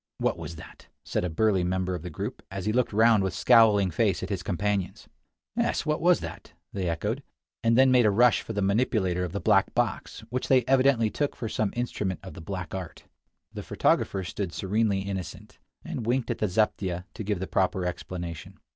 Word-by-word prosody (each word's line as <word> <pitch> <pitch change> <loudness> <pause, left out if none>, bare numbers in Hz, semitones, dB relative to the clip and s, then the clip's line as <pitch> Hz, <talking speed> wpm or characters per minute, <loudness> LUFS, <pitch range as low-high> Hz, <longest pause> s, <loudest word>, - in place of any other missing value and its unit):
"What - - 0
was 85 - -7
that?" 80 - -13 0.2
said - - -2
a 90 - -1
burly 95 +2 +2
member 95 +1 -1
of 90 - -4
the 90 - -6
group, 75 - -5
as 95 -1 -5
he 105 - 0
looked 125 0 +1
round 110 0 +5
with 95 -2 -2
scowling 105 -2 +5
face 100 +2 +1
at 95 - -4
his 95 -3 -2
companions. 100 +1 -2 0.5
"Yes; - - 0
what 150 0 0
was 175 +1 +4
that?" - - -8 0.2
they 95 -3 -2
echoed, 105 +10 -2 0.4
and 115 0 +3
then 130 0 +6
made 125 -3 +5
a - - +5
rush 120 +4 +4
for 110 - -6
the 100 -1 -1
manipulator 100 -4 +1
of 90 - -3
the 100 - -3
black 100 -3 +2
box, - - -1
which 125 +1 -2
they 130 -2 +4
evidently 130 -4 +3
took 145 -1 -1
for 115 - -4
some 110 -1 -1
instrument 105 -6 -2
of - - -9
the - - -10
black 95 0 -6
art. 95 -4 -6 0.5
The - - -5
photographer 95 - +1
stood 90 +1 -4
serenely 100 0 0
innocent, 95 -2 -6 0.3
and - - -4
winked 120 +2 0
at - - -4
the 105 - +1
zaptieh 95 -3 0
to 110 - -6
give 100 -2 -1
the 95 - -3
proper 95 -1 0
explanation. 90 0 -6
100 Hz, 205 wpm, -27 LUFS, 90-115 Hz, 0.5 s, then